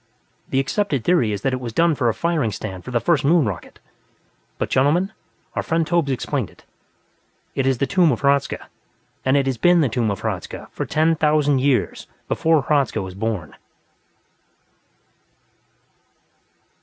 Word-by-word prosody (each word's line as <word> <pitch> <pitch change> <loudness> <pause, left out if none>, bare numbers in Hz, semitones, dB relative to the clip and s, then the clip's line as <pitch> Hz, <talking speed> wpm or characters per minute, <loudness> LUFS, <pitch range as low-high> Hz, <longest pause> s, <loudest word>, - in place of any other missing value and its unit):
The 135 - +1
accepted 140 - -1
theory 145 -10 +2
is 105 0 -4
that 135 - +1
it 130 - -1
was 120 -3 -6
done 170 +5 +3
for 125 -4 +1
a - - +1
firing 165 -8 0
stand 95 -3 -6
for - - -8
the 120 -1 +1
first 155 +6 +1
Moon 155 +1 +4
rocket. 95 -5 -6 0.8
But - - -3
gentlemen, 170 +10 +2 0.4
our - - -1
friend 165 0 0
Tobbh's 170 -3 +1
explained 130 - -2
it. - - -21 0.9
It 135 -1 0
is 135 -2 +2
the 140 - +1
tomb 170 +4 +3
of 120 - -2
Hradzka, 140 0 +1 0.6
and 130 +2 +3
it 140 - +2
has 130 -4 -2
been 175 -1 +5
the 140 - +2
tomb 115 -1 0
of 100 - -3
Hradzka - - -5
for - - -4
ten 160 +1 +2
thousand 150 -3 +2
years 135 -1 0 0.2
before 160 -3 +2
Hradzka 140 -4 +1
was 95 -2 -5
born!" 100 -5 -3
135 Hz, 165 wpm, -21 LUFS, 115-160 Hz, 0.9 s, been